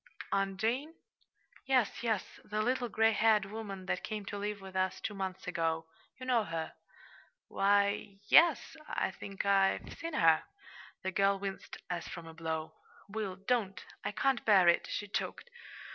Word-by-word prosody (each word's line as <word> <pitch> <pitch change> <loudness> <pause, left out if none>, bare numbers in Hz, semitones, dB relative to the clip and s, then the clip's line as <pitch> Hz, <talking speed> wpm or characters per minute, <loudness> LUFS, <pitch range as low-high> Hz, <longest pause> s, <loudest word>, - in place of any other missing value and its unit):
"Aunt 195 -1 0
Jane?" 260 +9 -1 0.7
"Yes, 255 -5 +2
yes 220 -5 -2
the 215 0 -1
little 245 0 0
gray 225 +1 +4
haired 215 -2 +4
woman 200 -2 -6
that - - -2
came 210 -2 -4
to 205 - -5
live 205 0 -3
with 190 -1 -11
us 185 0 0
two 215 - -4
months 190 -2 -4
ago. 165 -2 -1 0.3
You 255 - -6
know 245 -3 +3
her." 165 -4 -4 0.8
"Why, 200 0 +4
y 200 -1 -9
yes; 330 +5 +5
I - - 0
think 195 +1 -6
I've 195 -1 +2
seen 330 -1 -4
her." 165 -1 +5 0.6
The 190 - -1
girl 195 0 +3
winced, 195 -1 -6
as 175 -2 -3
from 170 - -7
a 165 - -10
blow. 160 -1 -4 0.4
"Will, 205 -3 -3
don't! 195 -1 -1 0.2
I - - -1
can't 265 +4 +1
bear 195 -5 +6
it," 170 - +4
she 205 - -3
choked. 485 - -4
200 Hz, 165 wpm, -32 LUFS, 190-220 Hz, 0.8 s, bear